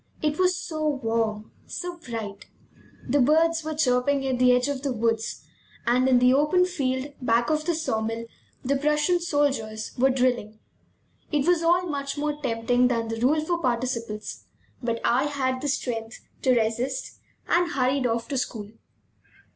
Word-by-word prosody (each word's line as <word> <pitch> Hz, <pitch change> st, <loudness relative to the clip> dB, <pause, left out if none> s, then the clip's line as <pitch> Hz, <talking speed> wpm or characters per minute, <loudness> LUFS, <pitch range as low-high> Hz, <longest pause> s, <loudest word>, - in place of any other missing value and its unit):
It 300 Hz, +1 st, -1 dB
was 365 Hz, 0 st, +3 dB
so 310 Hz, -3 st, -3 dB
warm, 225 Hz, -6 st, -1 dB, 0.2 s
so 355 Hz, -1 st, -5 dB
bright! 220 Hz, -8 st, -6 dB, 0.6 s
The 275 Hz, +3 st, +3 dB
birds 325 Hz, +4 st, +3 dB
were 310 Hz, 0 st, -4 dB
chirping 270 Hz, -1 st, +2 dB
at 260 Hz, -2 st, -1 dB
the 250 Hz, 0 st, +6 dB
edge 250 Hz, +1 st, +3 dB
of 280 Hz, -2 st, -2 dB
the 280 Hz, -1 st, -1 dB
woods; 225 Hz, -1 st, -1 dB, 0.4 s
and 250 Hz, +2 st, +3 dB
in 255 Hz, -, +5 dB
the 250 Hz, +1 st, +5 dB
open 300 Hz, +6 st, +3 dB
field 275 Hz, -5 st, -2 dB
back 235 Hz, +3 st, +2 dB
of 305 Hz, 0 st, 0 dB
the 345 Hz, -, +1 dB
saw 265 Hz, -9 st, -1 dB
mill 225 Hz, +1 st, -3 dB, 0.4 s
the 275 Hz, +2 st, +2 dB
Prussian 300 Hz, +5 st, +2 dB
soldiers 275 Hz, -10 st, -1 dB
were 265 Hz, +2 st, +5 dB
drilling. 245 Hz, -5 st, 0 dB, 0.7 s
It 290 Hz, -3 st, +1 dB
was 350 Hz, -1 st, +3 dB
all 350 Hz, +2 st, +3 dB
much 280 Hz, -3 st, -3 dB
more 295 Hz, 0 st, -2 dB
tempting 245 Hz, -1 st, +2 dB
than 230 Hz, -2 st, -1 dB
the 225 Hz, 0 st, -3 dB
rule 305 Hz, +5 st, +2 dB
for 345 Hz, +1 st, 0 dB
participles, 235 Hz, -4 st, -3 dB, 0.4 s
but 235 Hz, -2 st, -1 dB
I 255 Hz, +4 st, +3 dB
had 260 Hz, -3 st, -1 dB
the 290 Hz, -, -2 dB
strength 235 Hz, -4 st, -3 dB, 0.2 s
to 255 Hz, -3 st, +3 dB
resist, 240 Hz, +4 st, -2 dB, 0.3 s
and 345 Hz, 0 st, +2 dB
hurried 260 Hz, -1 st, +1 dB
off 230 Hz, 0 st, -2 dB
to 275 Hz, -3 st, 0 dB
school. 215 Hz, -4 st, -5 dB
260 Hz, 165 wpm, -25 LUFS, 235-300 Hz, 0.7 s, the